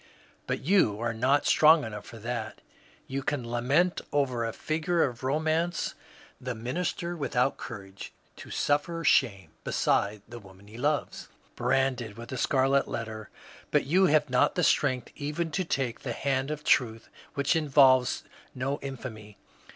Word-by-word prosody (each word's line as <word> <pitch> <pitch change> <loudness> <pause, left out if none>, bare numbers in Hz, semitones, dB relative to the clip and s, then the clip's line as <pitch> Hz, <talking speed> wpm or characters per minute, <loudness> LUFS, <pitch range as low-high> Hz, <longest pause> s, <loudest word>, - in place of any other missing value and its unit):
But - - -2
you 140 - +3
are 115 0 -1
not 130 +6 +2
strong 155 0 +6
enough 105 -2 -7
for 115 - -10
that. 115 0 -5 0.4
You 135 +1 -4
can 130 -3 -2
lament 135 +10 +1
over 130 -5 0
a 115 - -2
figure 160 +6 0
of 120 -3 -3
romance, 155 +5 0 0.5
the 125 -1 -4
minister 170 +8 -3
without 135 -4 0
courage 100 -4 -9 0.3
to - - -11
suffer 165 +3 0
shame 100 - +2
beside 100 0 0
the 120 - -9
woman 95 -1 -16
he 105 - -13
loves, 145 +2 -1 0.3
branded 125 -5 0
with 115 0 -9
a 130 - -4
scarlet 135 +2 +2
letter, 110 -2 -5 0.4
but - - +2
yon 185 +7 +4
have 150 0 +3
not 125 0 +2
the 180 - +1
strength 130 -5 +1
even 155 +3 -3
to 185 +5 0
take 135 -8 -2
the 125 - -4
hand 135 +2 -1
of 150 -1 -4
Truth 115 -6 +2 0.3
which 140 +4 +1
involves 135 -5 +4 0.3
no 135 +2 -2
infamy. 115 -6 -8
130 Hz, 150 wpm, -28 LUFS, 115-150 Hz, 0.5 s, strong